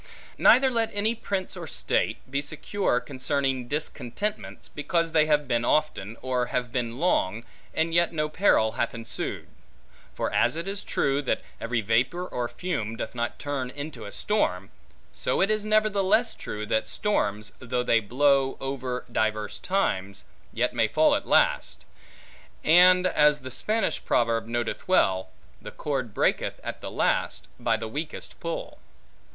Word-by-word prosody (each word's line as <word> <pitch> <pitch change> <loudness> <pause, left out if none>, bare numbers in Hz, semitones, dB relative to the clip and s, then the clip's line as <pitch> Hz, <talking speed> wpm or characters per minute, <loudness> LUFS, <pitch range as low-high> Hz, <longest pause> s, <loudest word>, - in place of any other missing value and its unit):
Neither 265 0 +6
let 230 -2 +1
any 215 +3 +1
prince, 200 -5 -3
or - - -7
state, - - 0
be 140 +2 -1
secure 155 0 -1
concerning 135 -1 -1
discontentments, 150 - -4
because 165 +3 -1
they 155 -1 +4
have 150 -2 +2
been 120 -2 +1
often, 120 -7 0
or 125 -1 0
have 120 -1 -2
been 120 -1 -2
long, 115 - +1 0.3
and 165 +1 +1
yet 170 0 +4
no 150 -2 -1
peril 150 - +3
hath 120 0 -2
ensued: 115 -1 -4 0.7
for - - -2
as - - +3
it 165 +3 -4
is 200 0 -3
true, 140 +1 0
that 140 - -1 0.2
every 120 0 -1
vapor 120 - +1
or 120 -7 -2
fume 115 -10 -3
doth 110 - -5
not 120 -1 -3
turn 140 -3 -3
into 140 -3 -7
a 100 - -7
storm; 95 - -1 0.4
so - - -1
it 195 +2 +3
is 215 -1 0
nevertheless 215 +1 +3
true, 105 0 -6
that 110 +1 0
storms, 105 - -1
though 125 0 -2
they 115 -2 +4
blow 135 +4 +2
over 130 -2 -4
divers 110 -2 -1
times, 100 - -1 0.3
yet - - 0
may - - +2
fall - - +4
at - - -1
last; - - +2 0.8
and, 180 +3 +6
as 150 -4 +4
the 130 0 -7
Spanish 220 - 0
proverb 115 -1 +1
noteth 120 0 -3
well, 95 - +3 0.3
The - - -7
cord 135 -6 -3
breaketh - - 0
at - - -6
the - - -5
last - - 0
by 115 -2 +1
the 110 0 -5
weakest 150 +7 -6
pull. 165 0 -5
135 Hz, 155 wpm, -26 LUFS, 115-170 Hz, 0.8 s, Neither